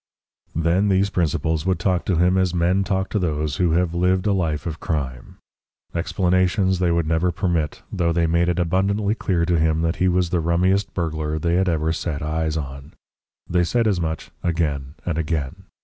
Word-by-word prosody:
Then 85 +5 +2
these 95 +1 +2
principals 80 -2 0
would 95 - +2
talk 90 -3 0
to 95 - +1
him 90 +3 +3
as 95 -2 +1
men 90 +3 +2
talk 95 -1 -1
to 105 - 0
those 75 -4 -1
who 90 -3 +2
have 85 0 +1
lived 90 +2 +1
a 105 - +3
life 80 -5 -1
of 80 -2 -4
crime. 65 -6 -4 0.6
Explanations 95 +2 +1
they 90 -2 +2
would 85 -1 +1
never 80 +3 +1
permit, 85 -3 -1
though 85 -2 0
they 85 0 +1
made 85 +2 +2
it 90 - 0
abundantly 100 +4 +1
clear 90 -6 0
to 85 -1 +1
him 80 0 +1
that 80 0 0
he 95 - +2
was 90 -1 +1
the 90 -2 +1
rummiest 90 +4 +1
burglar 80 -3 -2
they 85 +2 0
had 95 +1 +2
ever 80 -1 0
set 80 -3 -3
eyes 80 +1 -1
on. 70 -2 -7 0.5
They 90 0 +2
said 115 +7 +1
as 100 -5 +1
much 80 -1 -4
again 75 -5 -1
and 80 -2 -1
again. 80 +3 -3
85 Hz, 195 wpm, -22 LUFS, 80-95 Hz, 0.6 s, him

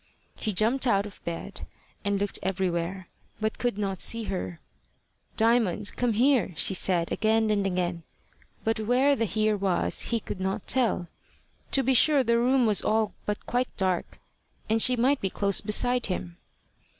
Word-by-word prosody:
He 215 - -3
jumped 230 +7 +1
out 200 -3 +2
of 205 - -12
bed, 170 -1 -6 0.4
and 200 -1 0
looked 205 0 -1
everywhere, 185 -1 -2 0.3
but 215 0 -2
could 245 -4 -1
not 195 -3 -3
see 230 0 +2
her. 90 - -5 0.8
"Diamond, 220 -3 +1
come 245 -2 0
here," 245 -3 +2
she 190 - +4
said 180 -2 +2
again 220 0 +1
and 200 -2 +1
again; 180 -2 -2 0.6
but 225 0 0
where 250 +6 +2
the 230 - -1
here 215 +2 0
was 190 -3 0
he 235 - 0
could 205 - -7
not 190 +1 -3
tell. 235 -9 0 0.7
To 270 - +3
be 265 - +2
sure 275 +2 +5
the 235 -1 +2
room 255 +1 +2
was 210 -3 +4
all 220 0 0
but 210 0 -3
quite 245 +1 -2
dark, 185 -3 -2 0.5
and 220 +1 +2
she 255 - +5
might 260 +4 +1
be 195 - -1
close 200 0 0
beside 245 +4 +1
him. 175 -2 -5
215 Hz, 165 wpm, -26 LUFS, 190-240 Hz, 0.8 s, sure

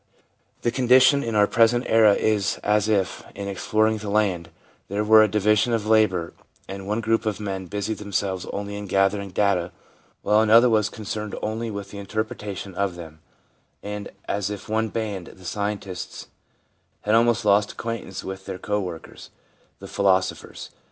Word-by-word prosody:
The 120 - +1
condition 130 +3 +5
in 115 -2 -3
our 105 -1 +5
present 115 +3 +3
era 110 -2 +5
is 105 -3 0
as 105 0 +2
if, 100 -4 0
in 100 0 -5
exploring 110 +2 +1
the 105 -1 -6
land, 95 -5 0 0.4
there 100 +2 -1
were 110 +1 +7
a 110 - +5
division 105 +3 +2
of 110 -2 0
labour 105 -6 +2 0.3
and 95 0 -7
one 105 +3 -1
group 115 0 0
of 105 -1 -1
men 95 -3 -4
busied 105 +4 -3
themselves 100 -3 -2
only 100 0 -5
in 105 0 -6
gathering 100 +1 +1
data 90 -2 +1 0.5
while 105 +1 +4
another 115 +3 +6
was 110 -1 +2
concerned 105 0 -5
only 110 +2 -2
with 100 -2 -6
the 100 - -8
interpretation 105 -1 -5
of 95 -1 -1
them, 80 -3 -10 0.6
and 105 0 -5 0.2
as 100 -1 -1
if 105 -2 -7
one 110 +1 0
band, 105 -5 -4
the 95 - -14
scientists, 100 -2 -5 0.7
had 105 - 0
almost 115 -1 +3
lost 100 0 +3
acquaintance 115 -5 -5
with 95 0 -7
their - - -4
co 105 +2 -2
workers, 90 -4 -8 0.5
the - - -10
philosophers. 95 -2 -1
105 Hz, 165 wpm, -24 LUFS, 95-110 Hz, 0.7 s, were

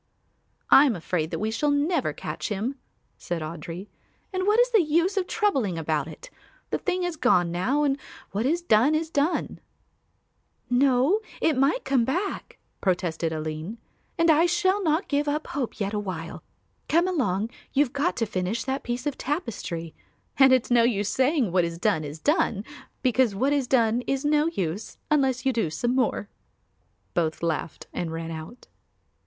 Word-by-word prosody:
"I 275 - +9
am 240 - +1
afraid 165 -2 -2
that - - -3
we 215 +1 -1
shall 295 +6 0
never 290 +5 +1
catch - - -5
him," 215 +6 -2 0.5
said 170 -2 -3
Audry, 165 +3 -6 0.5
"and 370 +1 -1
what 425 +2 +4
is - - +4
the 445 -4 +5
use 340 +5 +1
of 380 -2 0
troubling 270 - 0
about 155 -2 -1
it? - - -11 0.4
The - - 0
thing 370 -1 -1
is 355 -2 -2
gone 180 - +3
now 250 +13 +1
and 280 -1 +1 0.3
what 215 +6 0
is 340 +4 0
done 265 +1 +4
is 320 +1 -2
done." 290 +4 0 1.1
"No, 265 - +4 0.2
it 320 -2 +2
might 275 - +2
come 270 -3 +3
back," 360 - -3 0.2
protested 175 -3 0
Aline, 155 +6 -4 0.4
"and 330 -1 +5
I 320 +3 +4
shall 375 +3 +2
not 320 0 +1
give 290 0 0
up 300 +2 -1
hope 265 -5 -4
yet 200 0 -2
awhile. 185 -6 -4 0.5
Come 340 +3 +3
along, 225 - 0 0.2
you 285 +2 +4
have 255 - -12
got 295 +6 0
to 225 - +1
finish 200 +3 -2
that 265 +1 -2
piece 245 +2 -4
of 290 -2 -2
tapestry 205 - -4 0.4
and 270 -1 +6
it's 255 -1 +3
no 240 -1 +6
use 210 -4 +1
saying 260 - +2
what 180 0 +3
is 170 0 -3
done 175 -4 +1
is 150 +1 -6
done, 230 - +1 0.4
because 250 -4 +2
what 265 +8 +1
is 280 -3 0
done 235 -2 +3
is 275 +1 -1
no 300 +1 +3
use, 195 - -3
unless 265 -3 +2
you 265 - +3
do 220 -8 0
some 240 +10 -1
more." 250 -5 0 0.9
Both 160 -1 -1
laughed 165 -1 -2
and 170 -2 -3
ran 165 0 -5
out. 160 +9 -8
250 Hz, 175 wpm, -26 LUFS, 185-300 Hz, 1.1 s, I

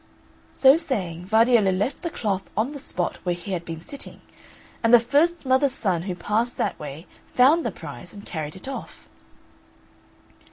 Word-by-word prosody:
So 270 +2 +7
saying 185 - -3
Vardiello 220 -1 +4
left 205 +9 -1
the 340 - -2
cloth 200 - -3
on 225 +6 +1
the 290 - -7
spot 180 -9 -2
where 180 -1 -1
he 175 +3 -8
had 175 -2 -2
been 165 -1 -7
sitting, 280 - -7 0.6
and 230 - +3
the 240 - +9
first 295 +8 +2
mother's 260 +1 +3
son 185 -9 0
who 180 - -2
passed 220 +7 0
that - - -1
way 150 +3 -7 0.3
found 290 +7 +5
the - - 0
prize - - -9
and 205 -1 -11
carried 155 -2 -5
it 190 - -11
off. 270 - -8
220 Hz, 170 wpm, -24 LUFS, 180-265 Hz, 0.6 s, the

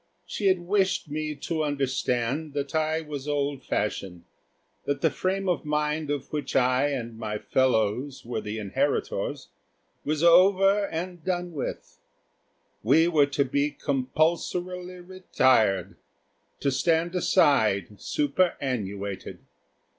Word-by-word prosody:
She 205 - -2
had 185 -2 +3
wished 190 -4 0
me 155 0 -3
to 155 +3 -2
understand 140 0 -1
that 140 -1 -3
I 160 0 +1
was 150 -3 -7
old 140 -2 -1
fashioned; 95 -4 -3 0.6
that 140 -1 -1
the - - +3
frame 190 +1 -2
of 180 - 0
mind 150 0 -1
of 145 0 -4
which 150 -1 -3
I 130 +2 +3
and 120 -5 -4
my 105 -2 -3
fellows 125 +3 0
were 120 - -3
the 105 +1 -5
inheritors 100 -3 -2 0.5
was 155 +2 -1
over 195 +3 +5
and 175 0 -5
done 180 -1 -2
with. 140 - -6 0.8
We 155 +9 +4
were 150 -4 +4
to 140 0 0
be 140 +2 0
compulsorily 175 +6 -1
retired; 130 - +1 0.6
to 140 - +1
stand 165 +5 +1
aside 110 - +2
superannuated. 125 - -1
145 Hz, 120 wpm, -26 LUFS, 130-170 Hz, 0.8 s, over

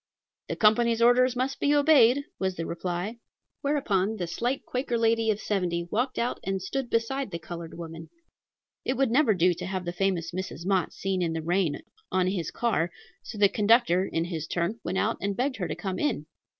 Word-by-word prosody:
"The - - -1
company's 230 +2 +4
orders 245 +2 +5
must 260 +2 -1
be 290 +1 +3
obeyed," 285 -3 +5 0.2
was 190 -1 -1
the 165 - -4
reply. 175 +6 -3 0.4
Whereupon 220 -8 +1
the 185 -5 -3
slight 240 +10 -2
Quaker 250 -1 -1
lady 225 0 +2
of 210 -1 +1
seventy 180 -5 -1
walked 250 +4 0
out 235 +1 -1
and 195 0 -1
stood 245 +7 -3
beside 250 +4 0
the 170 - -4
colored 165 0 -8
woman. 165 -1 -8 0.7
It 260 - -1
would 270 -3 +2
never 245 -4 +4
do 180 0 +4
to 175 +2 -6
have 185 -1 -3
the 175 - -3
famous 180 -3 0
Mrs. 180 -2 -5
Mott 190 -3 +1
seen 190 -1 -2
in 165 -2 0
the 160 -1 -3
rain 170 -3 +1 0.3
on 185 -1 +2
his 185 -3 -1
car; 220 -8 0 0.3
so 220 - -9
the 205 -1 +6
conductor, 210 -3 +3
in 165 0 0
his 165 -3 -4
turn, 175 +6 -1
went 180 +3 -2
out 220 +3 +1
and 200 0 -2
begged 260 +1 0
her 180 -4 -2
to 150 - -3
come 185 +2 -4
in. 295 - 0
195 Hz, 200 wpm, -27 LUFS, 175-240 Hz, 0.7 s, the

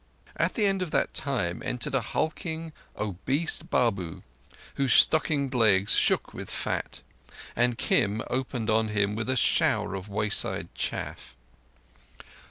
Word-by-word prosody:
At - - 0
the 215 - +2
end 195 -1 +1
of 180 - -2
that - - 0
time 105 -12 -1
entered 125 +2 -3
a 135 - +2
hulking, 160 +5 -3 0.2
obese 110 - 0
Babu 95 -9 -1 0.5
whose 135 -3 +1
stockinged 145 -4 +3
legs 105 -5 +3
shook - - +2
with - - -7
fat, - - -3 0.5
and 120 0 +2
Kim 105 0 +1
opened 125 -3 -2
on 110 0 +2
him 100 -1 0
with 110 +3 -3
a 130 - +2
shower 115 - +2
of 95 +1 -6
wayside 105 +1 -1
chaff. - - -4
120 Hz, 135 wpm, -27 LUFS, 105-140 Hz, 0.5 s, stockinged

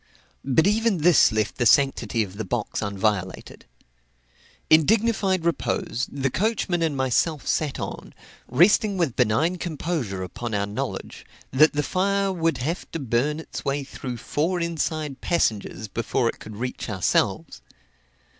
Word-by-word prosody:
But 140 +5 +3
even 215 0 +2
this 175 -2 +6
left 110 0 -1
the 120 - +2
sanctity 125 -4 +3
of 100 -1 -9
the 110 - -3
box 95 - -3
unviolated. 100 -2 -2 1.0
In 155 0 +6
dignified 205 -3 +1
repose, 140 -6 -1
the 135 -1 -1
coachman 195 - 0
and 160 -4 0
myself 130 +4 0
sat 150 -4 -1
on, - - -7 0.3
resting 195 - +4
with 165 -9 0
benign 145 +10 +1
composure 150 - -3
upon 110 +5 -5
our 100 0 0
knowledge 100 +1 -5 0.3
that 150 +4 +5
the 150 0 0
fire 195 +3 0
would 165 -5 0
have 155 +8 -3
to 165 - -2
burn 135 +4 0
its 160 - -7
way 140 0 -1
through 125 -2 -6
four 165 +9 -1
inside 155 -4 -2
passengers 110 - -1
before 115 +4 -1
it - - -7
could 110 - -10
reach 125 +2 -5
ourselves. 95 -4 0
145 Hz, 145 wpm, -24 LUFS, 115-170 Hz, 1.0 s, this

